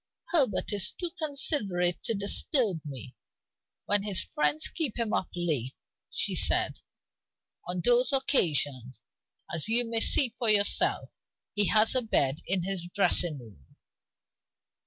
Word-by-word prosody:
"Herbert 280 -10 +2
is 200 -3 0
too 350 -2 -6
considerate 275 - -1
to 225 - +3
disturb 200 - +2
me, 135 -3 -9 0.7
when 205 0 +1
his 200 -2 0
friends 150 +1 0
keep 300 -10 -3
him 230 -3 -2
up 185 - -2
late," 150 -8 -3 0.3
she - - -1
said. - - +1 0.9
"On 180 0 -3
those 245 +6 +3
occasions, 145 - 0 0.5
as 170 +5 -3
you 240 +2 +3
may 230 0 +1
see 240 +1 +3
for 235 -3 0
yourself, 205 -1 +1 0.4
he 205 -1 +2
has 220 0 +3
a 255 - +3
bed 145 - -1
in 185 -1 -1
his 190 -2 -3
dressing 175 -5 +2
room." 105 - -17
200 Hz, 135 wpm, -27 LUFS, 160-240 Hz, 0.9 s, to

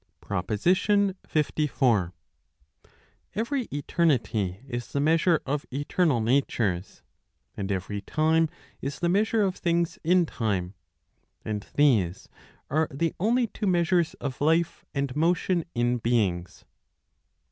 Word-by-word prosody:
PROPOSITION 180 - +1 0.2
LIV. 135 - +1 1.2
Every 235 +4 -1
eternity 130 - 0
is 120 -2 -5
the 140 - 0
measure 160 +2 +3
of 145 +1 -2
eternal 145 0 +1
natures, 110 -7 0 0.5
and 100 0 -3
every 100 +2 -3
time 160 +7 +2 0.3
is 140 +1 -4
the 175 - +1
measure 215 +3 +2
of 190 -2 0
things 170 -1 0
in 175 +2 +4
time; 100 - -2 0.7
and 105 -1 -4
these 110 -12 +2 0.4
are 155 +3 +1
the 160 +4 -1
only 235 +6 +2
two 215 -2 -4
measures 175 -2 +2
of 135 -2 -6
life 165 +3 +1
and 140 -2 -1
motion 170 +2 +1
in 120 +1 +1
beings. 100 -7 -1
145 Hz, 115 wpm, -26 LUFS, 110-170 Hz, 1.2 s, in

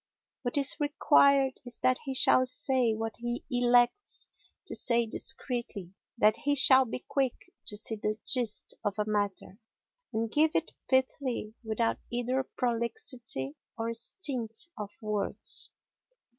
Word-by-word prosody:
What 245 +1 -2
is 280 -1 +4
required 280 -2 +3
is 245 -2 -8
that 255 0 +3
he 270 -1 -3
shall 255 0 +5
say 255 -2 +1
what 225 0 -4
he 240 0 -4
elects 245 +8 +2 0.4
to - - -6
say 235 -1 +3
discreetly; 235 -6 -3 0.2
that 215 0 +4
he 285 0 0
shall 265 -1 +7
be 245 +1 -7
quick 270 -3 -2
to 210 - -4
see 220 +1 -2
the 210 +1 -2
gist 240 -5 +1
of 205 -1 -1
a 210 - 0
matter, 205 -1 -3 0.5
and 225 0 -2
give 310 +3 +2
it 330 - -1 0.2
pithily 260 -4 0
without 225 +1 -1
either 245 +2 0
prolixity 235 - -2 0.2
or 230 0 -2
stint 235 -2 -1 0.2
of 210 -3 -6
words. 210 -1 -1
240 Hz, 135 wpm, -29 LUFS, 220-260 Hz, 0.5 s, shall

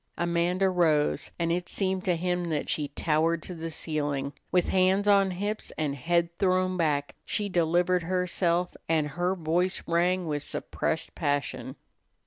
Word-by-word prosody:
Amanda 175 +2 +1
rose, 160 -5 +2
and 170 -1 0
it 175 +1 -1
seemed 190 -1 -1
to 180 -2 +2
him 180 +1 -1
that 160 -3 -2
she 150 -2 0
towered 160 +3 0
to 180 - -6
the 165 -1 -5
ceiling. 145 -3 -2 0.2
With 180 -1 +2
hands 190 +2 +3
on 200 -1 +5
hips 205 +4 -3
and 150 -3 -1
head 170 +4 0
thrown 185 -1 +2
back, 150 -4 0
she 205 -2 -2
delivered 175 +1 +2
herself, 180 0 0
and 155 -2 +2
her 175 +5 -1
voice 175 +2 0
rang 175 +2 +1
with 150 -2 -2
suppressed 160 +2 -3
passion. 145 -3 -2
175 Hz, 150 wpm, -28 LUFS, 160-185 Hz, 0.2 s, on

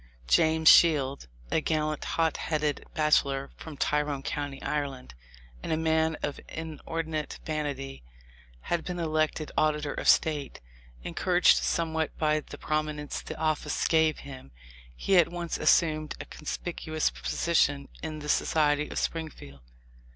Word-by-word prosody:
James 160 - +3
Shields, 140 - +6 0.2
a 160 - +2
"gallant, 155 -1 -1
hot 165 -2 0
headed 150 -2 -2
bachelor 140 -3 +2
from 155 -3 -10
Tyrone 145 -2 0
county, 145 -1 -4
Ireland," 140 - -3 0.5
and - - -4
a 160 - +2
man 160 0 +1
of 145 - -2
inor 160 +1 -5
dinate 155 -1 -4
vanity, 140 -3 -4 0.6
had 170 - -1
been 180 -1 -4
elected 155 -2 -1
Auditor 150 -1 +1
of - - 0
State. 150 -3 +2 0.4
Encouraged - - +3
somewhat 160 - -1
by 155 -1 +2
the - - -10
prominence 155 -1 -2
the - - -7
office 155 -2 -1
gave 160 -2 +3
him, 130 - -10 0.5
he 195 - +2
at 175 - +5
once 175 -1 -4
assumed 155 -2 +2
a - - -6
conspicuous 155 0 -3
posi 170 0 -2
tion 140 -3 +3
in 155 0 -5
the 150 -1 -7
society 150 -1 +2
of - - -6
Springfield. 150 - -4
155 Hz, 135 wpm, -28 LUFS, 145-160 Hz, 0.6 s, Shields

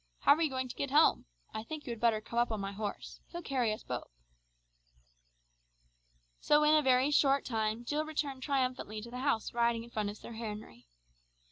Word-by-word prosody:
How - - +7
are 310 - -2
you 320 - +3
going 260 -1 -2
to 245 - -8
get 280 - -2
home? 300 - +4 0.3
I 220 - -3
think 295 +7 -7
you 245 - -4
had 230 - -5
better 225 -2 +2
come 235 +1 -3
up 240 -1 +2
on 220 - -2
my 195 0 -3
horse. 205 0 -5
He'll 345 0 -7
carry 255 -6 0
us 215 - -5
both." 125 -1 -5 2.3
So 295 0 +4
in 300 +1 +5
a 310 - +6
very 260 +1 +3
short 275 -2 +3
time 220 0 -1
Jill 300 +4 0
returned 290 -4 -3
triumphantly 255 -6 -1
to 235 - -9
the 250 - -5
house 260 -5 0
riding 235 -1 +1
in 235 - -13
front 210 -3 -1
of 205 - -7
Sir - - -10
Henry. 215 - -7
240 Hz, 205 wpm, -32 LUFS, 220-280 Hz, 2.3 s, How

